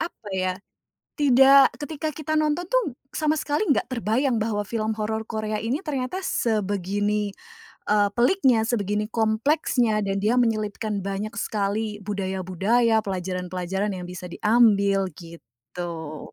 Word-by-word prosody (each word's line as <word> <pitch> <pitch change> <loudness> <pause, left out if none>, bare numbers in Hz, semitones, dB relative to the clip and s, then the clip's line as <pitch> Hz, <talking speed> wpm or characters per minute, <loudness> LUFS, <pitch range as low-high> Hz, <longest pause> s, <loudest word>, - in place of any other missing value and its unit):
apa 220 -10 -12
ya, 185 -1 0 0.6
tidak 270 -1 +6
ketika 310 +1 -4
kita 310 +1 -3
nonton 310 +3 +1
tuh 455 - 0 0.2
sama 310 0 +1
sekali 295 +5 -1
nggak - - +1
terbayang 245 +1 0
bahwa 210 -2 -1
film 220 -1 -1
horor 220 +1 -2
Korea 215 -1 -2
ini 235 +6 -1
ternyata 280 +5 -2
sebegini, 205 -1 0 0.6
eee, 205 -1 +4
peliknya, 245 - +3
sebegini 210 -2 -1
kompleksnya 225 0 +1
dan 195 -1 -1
dia 235 +4 +2
menyelipkan 215 -3 -1
banyak 200 +3 -3
sekali 210 0 -2
budaya-budaya, 195 +4 0
pelajaran-pelajaran 185 +1 -3
yang 180 -1 -6
bisa 180 0 -7
diambil, 200 -3 +3
gitu. 165 +1 -9
215 Hz, 120 wpm, -24 LUFS, 195-245 Hz, 0.6 s, tidak